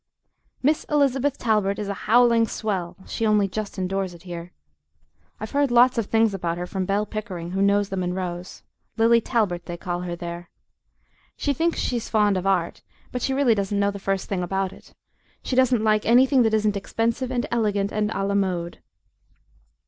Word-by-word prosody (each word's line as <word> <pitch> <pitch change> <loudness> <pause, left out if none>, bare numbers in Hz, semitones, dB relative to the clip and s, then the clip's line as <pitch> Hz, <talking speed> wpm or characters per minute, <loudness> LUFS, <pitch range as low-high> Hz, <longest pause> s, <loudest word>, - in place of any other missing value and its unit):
Miss 300 +3 +2
Elizabeth 280 -2 +1
Talbert 210 -4 +1
is 210 - -4
a 200 - -2 0.2
howling 235 -1 +5
swell; 185 -7 -3
she 230 - -4
only 210 -2 +3
just 205 +1 -5
endures 190 -1 -2
it 170 - -16
here. 175 -1 -7 0.9
I've 215 - -6
heard 285 -1 +2
lots 240 +1 +5
of 215 - -2
things 225 -2 +2
about 170 -3 -2
her 175 - -3
from 190 +1 -3
Bell 200 +2 +1
Pickering, 190 -5 -6
who 190 +1 -1
knows 200 0 +3
the 195 - -3
Munroes 180 0 -4 0.3
Lily 230 +1 +5
Talbert, 195 -8 -1
they 175 -1 -5
call 175 0 -3
her 175 -1 -4
there. 170 0 -7 0.9
She 285 - 0
thinks 330 +5 0
she's 240 -2 -2
fond 210 -2 +3
of 185 +1 -2
Art, 180 -3 0 0.3
but 250 - -4
she 270 - 0
really 270 -4 +4
doesn't 200 -1 -1
know 200 0 +2
the 200 - -7
first 195 0 -2
thing 190 -3 -2
about 190 +1 -2
it - - -18 0.5
she 255 - -2
doesn't 255 -3 +3
like 215 -1 +2
anything 255 +3 +5
that 225 -2 +2
isn't 210 -1 +1
expensive 230 +5 -1
and 245 -2 -1
elegant 205 -4 0
and 210 0 0
a 215 - -2
la 200 - -1
mode. 180 -4 -1
205 Hz, 185 wpm, -24 LUFS, 185-230 Hz, 0.9 s, howling